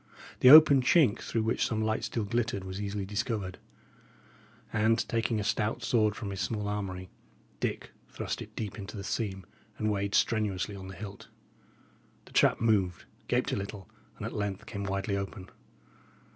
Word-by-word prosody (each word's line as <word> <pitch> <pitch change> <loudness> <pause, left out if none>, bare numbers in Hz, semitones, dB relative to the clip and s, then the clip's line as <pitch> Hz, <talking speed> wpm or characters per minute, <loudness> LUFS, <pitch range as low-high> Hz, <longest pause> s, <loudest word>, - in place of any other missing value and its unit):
The 125 - +7
open 150 -2 +10
chink 125 -4 +4
through 115 - -2
which 110 - +1
some 110 -1 -1
light 110 0 0
still 115 - -2
glittered 110 -1 -1
was 95 +1 -5
easily 100 -1 -3
discovered, 105 -2 -3 1.1
and, 110 +2 +2
taking 115 -1 0
a - - -1
stout 105 +2 -1
sword 110 -3 +2
from 105 -3 -5
his 95 -1 -4
small 105 +3 -2
armoury, 95 -3 -4 0.5
Dick - - -3 0.2
thrust - - -4
it - - -10
deep 110 -1 -5
into 100 0 -7
the 100 - -5
seam, 95 -3 -3 0.3
and 110 0 0
weighed 100 0 -1
strenuously 105 -3 +1
on 95 -1 -8
the 95 - -8
hilt. 100 +1 -9 1.0
The - - -17
trap - - +4
moved, 100 -6 +1 0.2
gaped - - +1
a - - 0
little, 100 0 -6 0.3
and 105 - -6
at 115 - -5
length 100 -2 -3
came 100 -3 -5
widely 100 +1 -1
open. 100 -1 -5
105 Hz, 170 wpm, -30 LUFS, 95-110 Hz, 1.1 s, open